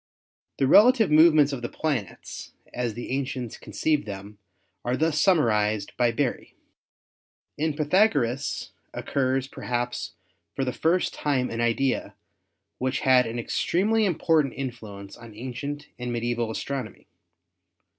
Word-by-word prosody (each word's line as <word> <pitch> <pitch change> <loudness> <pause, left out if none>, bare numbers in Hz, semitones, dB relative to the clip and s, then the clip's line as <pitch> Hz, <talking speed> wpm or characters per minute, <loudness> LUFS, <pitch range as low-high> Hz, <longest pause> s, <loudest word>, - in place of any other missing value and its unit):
The 135 - +2
relative 220 - +6
movements 155 -2 +6
of 130 - -4
the 120 - -4
planets 135 - -4 0.2
as 120 -3 -2
the 120 - -6
ancients 130 -3 -3
conceived 150 -6 -1
them 100 +1 -8 0.4
are 125 +1 0
thus 155 -1 +1
summarized 110 - +2
by 120 -1 +3
Berry: 125 +1 -2 1.0
"In 155 0 -1
Pythagoras 145 - +1 0.2
occurs 130 -1 0
perhaps 120 -2 -3 0.4
for 135 - -1
the 125 - -2
first 170 +7 +1
time 135 -4 0
an 115 +1 -2
idea 120 +3 0 0.6
which 130 +1 -1
had 130 -2 +5
an 115 +1 -4
extremely 205 - +1
impor 165 -2 +3
tant 140 -4 -4
influence 110 -7 -7
on 115 -2 -13
ancient 140 +5 -6
and 125 0 -3
medieval 120 -1 -1
astronomy. 130 +1 -5
130 Hz, 125 wpm, -26 LUFS, 120-150 Hz, 1.0 s, relative